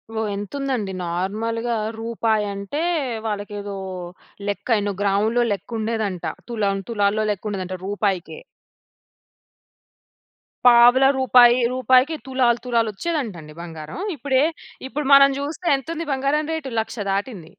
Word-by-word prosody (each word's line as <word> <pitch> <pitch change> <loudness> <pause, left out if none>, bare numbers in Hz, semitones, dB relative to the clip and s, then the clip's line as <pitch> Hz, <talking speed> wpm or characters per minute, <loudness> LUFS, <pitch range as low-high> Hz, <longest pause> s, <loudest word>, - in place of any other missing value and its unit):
ఓహ్! 220 -1 -1
ఎంతుందండి, 225 0 -3
నార్మల్‌గా 220 +7 -2 0.2
రూపాయంటే, 220 +2 -1 0.4
వాళ్ళకేదో 205 -1 -4 0.7
లెక్క, 205 +1 -3
ఎన్నో 205 -1 -2
గ్రాములో 210 +4 +2
లెక్కుండేదంట, 215 -2 -3 0.2
తు‌లం, 210 -5 0
తులాల్లో 210 -1 +1
లెక్కుండేదంట 190 -2 -4
రూపాయికే. 195 - -2 2.3
పావల, 245 +2 +7
రూపాయి, 245 -1 +6
రూపాయికి 255 +4 +3
తులాలు 250 -3 +2
తులాలొచ్చేదంటండి 225 - -2
బంగారం. 160 - -8 0.2
ఇప్పుడే, 265 +1 +1 0.4
ఇప్పుడు 290 +1 -4
మనం 275 0 +8
జూస్తే 310 +5 -5
ఎంతుంది 330 +5 -5
బంగారం 280 +3 0
రేటు, 285 -5 -4
1,00,000 225 - -8
దాటింది. 195 -4 -4
225 Hz, 95 wpm, -22 LUFS, 200-260 Hz, 2.3 s, మనం